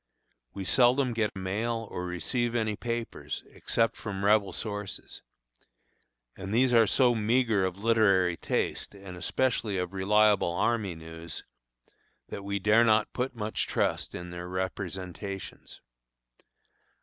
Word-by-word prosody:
We 95 Hz, -, -5 dB
seldom 125 Hz, +3 st, +4 dB
get 110 Hz, -2 st, 0 dB
a -, -, -7 dB
mail 110 Hz, +4 st, -2 dB
or 90 Hz, 0 st, -4 dB
receive 115 Hz, +8 st, -1 dB
any 110 Hz, -2 st, 0 dB
papers, 115 Hz, +1 st, -4 dB
except 115 Hz, -1 st, 0 dB
from 100 Hz, -2 st, -4 dB
rebel 105 Hz, -1 st, +4 dB
sources, 105 Hz, -2 st, -6 dB, 1.1 s
and 95 Hz, +1 st, -7 dB
these 125 Hz, +3 st, +3 dB
are 115 Hz, -2 st, +6 dB
so 125 Hz, +1 st, +4 dB
meagre 115 Hz, -2 st, +2 dB
of 95 Hz, +2 st, -3 dB
literary 100 Hz, -6 st, +4 dB
taste 95 Hz, -, -2 dB
and 95 Hz, -2 st, -9 dB
especially 110 Hz, +2 st, 0 dB
of 90 Hz, 0 st, -3 dB
reliable 100 Hz, -1 st, +3 dB
army 100 Hz, -1 st, 0 dB
news, 80 Hz, 0 st, -7 dB, 0.9 s
that 100 Hz, -, -6 dB
we 100 Hz, 0 st, -2 dB
dare 105 Hz, +4 st, +4 dB
not 110 Hz, -2 st, +3 dB
put 130 Hz, +1 st, -2 dB
much 110 Hz, -1 st, -2 dB
trust -, -, -1 dB
in 90 Hz, 0 st, -7 dB
their 90 Hz, 0 st, -6 dB
representations. 95 Hz, +1 st, -5 dB
105 Hz, 130 wpm, -29 LUFS, 95-115 Hz, 1.1 s, are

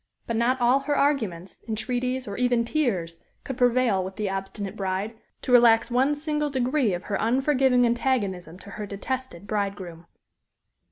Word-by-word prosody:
But 230 Hz, -, -3 dB
not 245 Hz, +3 st, +1 dB
all 245 Hz, +3 st, +4 dB
her 285 Hz, +1 st, -1 dB
arguments, 210 Hz, -, -1 dB
entreaties, 250 Hz, +3 st, -2 dB
or 200 Hz, -, -5 dB
even 245 Hz, -1 st, +1 dB
tears, 190 Hz, -, -1 dB, 0.2 s
could 265 Hz, -, -5 dB
prevail 245 Hz, -5 st, +2 dB
with 190 Hz, +1 st, -7 dB
the 210 Hz, -3 st, -2 dB
obstinate 195 Hz, +1 st, -5 dB
bride 195 Hz, +2 st, -2 dB, 0.3 s
to -, -, -3 dB
relax 235 Hz, -1 st, +5 dB
one 265 Hz, +4 st, +2 dB
single 300 Hz, 0 st, -1 dB
degree 260 Hz, -5 st, +1 dB
of 175 Hz, -, -7 dB
her 205 Hz, -, -2 dB
unforgiving 260 Hz, +1 st, +3 dB
antagonism 205 Hz, -9 st, -1 dB
to 200 Hz, -, -11 dB
her 210 Hz, 0 st, -6 dB
detested 205 Hz, -1 st, -5 dB
bridegroom. 195 Hz, -5 st, -4 dB
235 Hz, 155 wpm, -25 LUFS, 195-260 Hz, 0.3 s, relax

